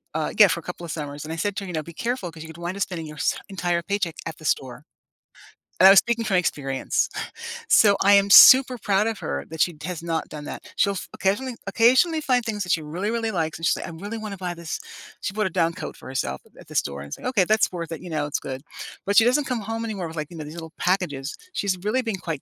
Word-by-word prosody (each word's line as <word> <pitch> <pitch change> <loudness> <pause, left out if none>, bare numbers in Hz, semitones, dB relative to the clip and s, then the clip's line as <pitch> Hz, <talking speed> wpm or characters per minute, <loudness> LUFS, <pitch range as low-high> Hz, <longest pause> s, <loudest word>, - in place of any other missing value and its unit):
uh, - - -1
yeah, - - +9
for - - -1
a - - -12
couple 175 - -7
of 165 - -6
summers. 145 -2 -5
And 160 - -5
I - - -4
said 200 +4 -2
to 200 - -2
her, 195 - -7
you 180 - -6
know, 155 - -2
"Be 170 +2 -11
careful 230 -4 -3
‘cause 160 0 -12
you - - -10
could 160 - -11
wind 180 +3 -3
up 200 - -6
spending 170 -5 -5
your 150 0 -10
sa - - +1
entire 175 -3 -1
paycheck 200 -3 -2
at 165 - -6
the 155 - -13
store," 135 +1 -2 1.0
and 190 - +9
I - - +11
was 195 - +8
speaking 235 -1 +2
from 195 -4 +1
experience. 135 -6 -1 0.6
So, 205 -2 +6
I 200 +1 +6
am 200 0 +5
super 255 +4 +9
proud 210 -1 +1
of 225 -3 -3
her 70 0 -3
that 160 - -8
she 175 - +2
has 180 -3 -4
not 165 -1 -2
done 150 -1 -8
that. - - -7 0.2
She'll 200 - +3
f - - -10
occasionally 235 +6 0 0.2
occasionally 260 - +4
find 250 -4 +2
things 210 -3 -2
that 180 - -3
she 160 - +2
really, 180 +8 -3
really 230 -1 -1
likes, 160 0 -3
and 165 - -3
she's - - +3
like, - - -6
“I - - -7
really 225 +3 -4
wanna 210 -3 -6
buy 175 - -2
this” 170 -1 -5 0.4
She - - -3
bought 215 -1 0
a - - -3
down 165 0 +2
coat - - -7
for - - -12
herself 130 -1 -3 0.2
at - - -16
the - - -10
store 70 0 -6
and 70 - -8
I - - -19
said, - - -7
"Okay, 210 -8 +3
that's 215 +3 +2
worth 170 -1 -5
it. 165 - -6
You - - -7
know, 155 -2 -1
it's 145 - -2
good." 130 0 -5 0.4
But 200 +1 +1
she 225 - +8
doesn't 255 +4 +3
come 235 -3 -1
home 225 0 -2
anymore 195 -6 -4
with, 160 - -9
like, 150 - -5
you 165 - -9
know, 155 - -6
these 150 - -9
little 160 0 -10
packages. 155 -7 0 0.2
She's 195 -2 -1
really 250 +5 +1
been 195 - -2
quite 155 -4 -2
180 Hz, 280 wpm, -24 LUFS, 160-215 Hz, 1.0 s, I